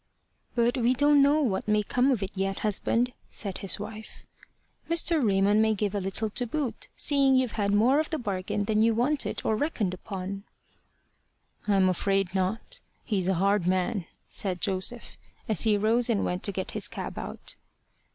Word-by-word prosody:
"But 240 +2 +2
we 245 +2 +2
don't 290 +2 +5
know 290 +2 +4
what 205 -7 -1
may 210 0 +2
come 250 +5 +1
of 240 -7 +1
it 195 - -4
yet, 195 0 -2
husband," 230 +4 0 0.2
said 195 -4 -3
his 195 -1 -1
wife. 215 +1 -9 0.6
"Mr. 335 -2 +3
Raymond 200 0 +3
may 220 0 +2
give 205 0 -1
a 205 - -1
little 200 +3 -2
to 245 +3 0
boot, 260 -3 -3
seeing 275 -2 +3
you've 255 -3 +2
had 200 -2 -1
more 235 +8 +4
of 310 - -1
the 315 - -1
bargain 200 -3 -2
than 215 +1 +1
you 225 0 +3
wanted 270 +5 0
or 220 - +2
reckoned 215 - -1
upon." 195 +1 -6 1.2
"I'm 195 -2 +4
afraid 195 0 0
not: 200 - -2 0.2
he's 195 -6 -1
a 190 - +2
hard 195 0 +1
man," 185 0 0 0.2
said 185 -3 -3
Joseph, 195 +6 -2 0.3
as 220 0 +3
he 215 -2 +3
rose 230 +4 +2
and 215 -4 +1
went 180 +1 -2
to 200 - +1
get 190 -1 -4
his - - -1
cab - - -6
out. - - -5
210 Hz, 180 wpm, -27 LUFS, 195-245 Hz, 1.2 s, don't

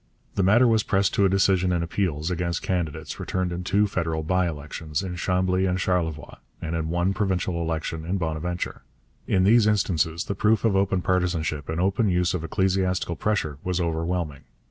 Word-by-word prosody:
The - - 0
matter 110 +7 +5
was 110 -2 +4
pressed 100 -2 +1
to 100 - +3
a - - +4
decision 95 -1 +3
in 85 -1 +1
appeals 85 -2 -1
against 85 -1 -2
candidates 80 -4 -3
returned 95 -1 -2
in 85 +1 -4
two 100 +3 +2
federal 80 -6 -2
by 90 +2 +1
elections, 75 +1 -4
in 90 -2 -4
Chambly 90 +1 +1
and 90 0 0
Charlevoix, 85 -5 -1 0.2
and 80 +1 -3
in 80 -1 -2
one 85 +3 +1
provincial 95 -3 -1
election, 80 -1 -3
in 90 +4 -1
Bonaventure. 85 +1 -3 0.5
In 95 - +2
these 110 +2 +5
instances 85 -5 +1
the - - -3
proof 110 +3 +2
of 105 -3 +3
open 95 -1 +1
partisanship 85 -5 0
and 80 +1 -2
open 100 +4 +2
use 90 0 +1
of 90 -3 -2
ecclesiastical 95 0 0
pressure 80 -7 -1
was 90 0 -1
overwhelming. 80 -3 -2
90 Hz, 180 wpm, -25 LUFS, 80-95 Hz, 0.5 s, matter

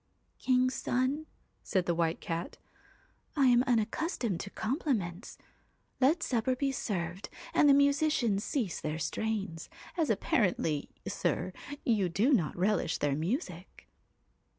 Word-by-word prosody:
1 255 -1 +4
King's 255 +1 +2
son,' 265 +6 -1 0.3
said 185 -2 0
the 170 - +1
White 165 -1 0
Cat, 165 +1 -4 0.4
* - - -37
I 280 -3 +4
am 245 -1 +5
unac 230 -4 +2
customed 245 - -2
to 200 - -5
compliments. 220 - -2 0.6
Let 305 +6 +3
supper 255 +1 +1
be 275 +1 0
served 185 -7 -3 0.2
and 290 - +5
the 275 - +8
musicians 280 -7 +2
cease 225 - -2
their 155 +1 -2
strains, 195 -1 -3 0.3
as 325 -5 +1
appa 210 -3 +1
rently, 165 - +1 0.2
sir, - - -1 0.3
you 210 -6 +2
do 220 - +2
not 175 - +1
relish 185 -2 +1
their 145 -1 0
music.' 195 - -4
220 Hz, 140 wpm, -31 LUFS, 175-265 Hz, 0.6 s, the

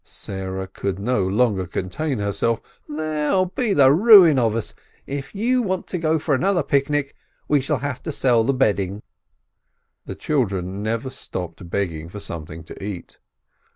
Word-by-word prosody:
Sarah 95 0 -6
could 95 0 -4
no 100 -2 0
longer 100 -3 +1
contain 125 - -3
her 100 -1 -1
self. 115 +3 0 0.3
"They'll 155 +4 0
be 225 +4 -2
the 135 -6 +6
ruin 180 - +8
of 115 -3 +1
us! 115 - -3 0.3
If 140 +6 -6
you 245 +5 +2
want 190 -5 -2
to 180 - -2
go 160 0 +2
for 150 -1 -1
another 180 +4 +2
picnic, 140 0 0 0.3
we 145 -2 +3
shall 145 +2 0
have 140 -3 -3
to 160 - -4
sell 125 -5 +3
the 130 - +2
bedding." 100 -6 0 1.0
The - - -5
children 100 -9 -1
never 115 +4 -2
stopped 90 -7 -7
begging 85 -4 -3
for 105 - -8
something 80 -3 -7
to 80 - -11
eat. 100 -3 -7
125 Hz, 160 wpm, -22 LUFS, 95-155 Hz, 1.0 s, ruin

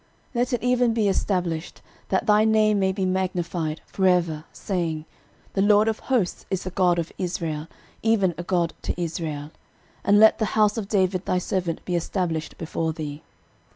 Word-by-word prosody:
13:017:024 - - -29
Let 245 +2 0
it 245 - -1
even 250 -1 +3
be 215 -3 +2
established, 180 -4 -1 0.3
that 190 +4 +1
thy 210 -1 +5
name 215 -1 +3
may 190 -1 +2
be 190 0 -1
magnified 175 -4 -1
for 190 -1 0
ever, 170 -4 +1
saying, 165 -5 -3 0.5
The 195 - +1
LORD 210 +1 +5
of 220 -1 0
hosts 240 -9 0
is 190 -1 -2
the 185 - -5
God 180 -1 +3
of 170 -1 -2
Israel, 165 -4 -3 0.3
even 210 -5 +2
a 170 - -5
God 175 -2 0
to - - -3
Israel: 155 -3 -4 0.5
and 205 +1 +5
let 220 +2 +7
the 220 - +2
house 210 -1 +4
of 220 -4 -3
David 190 -2 +1
thy 185 - +2
servant 180 -2 -2
be 180 - -1
established 170 -2 -2
before 160 0 -2
thee. 150 -2 -6
185 Hz, 180 wpm, -24 LUFS, 165-210 Hz, 0.5 s, let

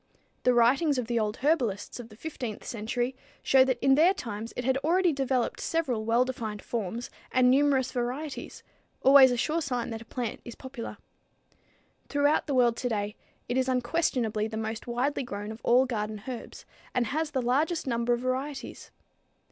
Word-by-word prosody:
The 250 - +3
writings 270 +5 +4
of 250 - -1
the 235 0 0
old 210 -1 -1
herbalists 245 -10 0
of 235 -1 -8
the 215 - -15
15th 250 -7 -6
century 240 +3 -2 0.3
show 265 -1 +6
that 260 -1 0
in 270 - +6
their 335 +7 +5
times 225 - -5
it 250 - -2
had 265 0 +2
already 340 +4 +2
developed 265 -3 -1
several 270 -10 -1
well 235 +3 +3
defined 220 -5 -5
forms 230 +1 -4 0.2
and 250 -1 +5
numerous 270 -1 +3
varieties, 260 +4 -4 0.4
always 270 -1 +8
a 245 - 0
sure 310 +7 0
sign 245 -5 -2
that 225 0 -5
a - - -11
plant 240 -1 -4
is 240 - -9
popular. 260 -3 -7 1.1
Throughout 290 +2 +2
the 280 - 0
world 240 -2 +4
today 210 -4 -2 0.3
it 245 - -1
is 260 0 +1
unquestionably 245 -5 0
the 220 0 -5
most 220 +1 -4
widely 250 +4 0
grown 210 -4 -5
of 220 +2 -9
all 250 +2 +5
garden 215 -4 -3
herbs, 250 -3 -7 0.3
and 250 - +2
has 310 +7 -1
the 275 - -1
largest 300 +8 +1
number 235 -2 0
of 240 - -1
varieties. 265 +3 -4
250 Hz, 175 wpm, -28 LUFS, 230-270 Hz, 1.1 s, always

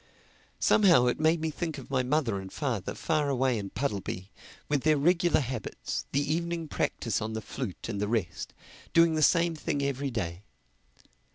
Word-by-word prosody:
Somehow 175 - +5
it 125 - +1
made 160 +2 +3
me 160 0 -1
think 160 0 -4
of 135 - -10
my 130 -1 +2
mother 125 -6 0
and 95 0 -8
father 120 - -2
far 155 -3 0
away 130 -3 +1
in 100 -1 -5
Puddleby, 100 -7 -3 0.4
with 145 -2 +1
their 155 +1 +3
regular 175 +3 +3
habits, 125 -5 -4
the 145 +2 +1
evening 170 0 -2
practise 115 -6 -1
on 110 +1 -3
the 110 - -2
flute 105 - -6
and 100 -3 -3
the 105 - 0
rest—doing 110 - 0
the 155 - 0
same 170 +2 +4
thing 145 -2 -2
every 140 0 -1
day. 95 -7 -3
140 Hz, 170 wpm, -29 LUFS, 110-155 Hz, 0.4 s, Somehow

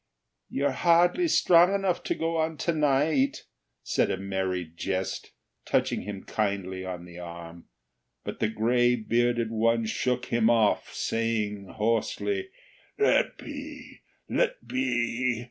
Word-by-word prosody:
"You're 140 +1 0
hardly 175 - +3
strong 180 - +5
enough 195 -3 0
to - - 0
go 165 0 -1
on 160 0 -1
to 170 - +2
night," 145 -2 +2 0.4
said - - +1
a - - -1
Merry 95 -2 -2
Jest, 95 +4 -4 0.3
touching - - 0
him 100 -1 -7
kindly 95 -3 -2
on 90 -2 -6
the 90 0 -11
arm; 85 -1 -9 0.6
but - - -6
the 110 - +1
gray 120 +3 +2
bearded 120 0 0
one 115 +1 +2
shook 125 +3 -1
him 115 -2 +2
off, 115 -3 +2
saying 110 -3 -1
hoarsely: 115 - -1 0.5
"Let 425 - +2
be! - - -9 0.3
Let - - -1
be! 125 - 0
115 Hz, 130 wpm, -27 LUFS, 100-155 Hz, 0.6 s, strong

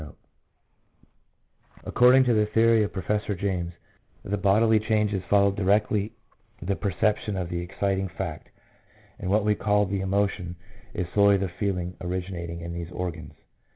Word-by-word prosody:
163 75 - -21
According 125 +2 +6
to 125 -2 +2
the 105 -1 +2
theory 115 0 +4
of 105 - -3
Professor 105 +2 -2
James, 90 -2 -2 0.5
the 100 - -1
bodily 105 +3 +3
changes 105 -3 0
follow 100 -1 +4
directly 105 +1 +1 0.5
the 100 0 -2
perception 105 +1 -1
of 90 -2 -3
the 85 -1 -3
exciting 95 +1 -2
fact, - - -5 0.7
and 90 - -4
what 105 +1 +2
we 105 - +3
call 105 0 +1
the 95 0 -2
emotion 95 -2 -1 0.4
is 90 - -1
solely 100 -1 +5
the 95 -2 -3
feelings 90 -3 -2
originating 90 -2 -4
in 85 0 -6
these 85 -1 -5
organs. 90 -3 -5
100 Hz, 145 wpm, -26 LUFS, 90-105 Hz, 0.7 s, According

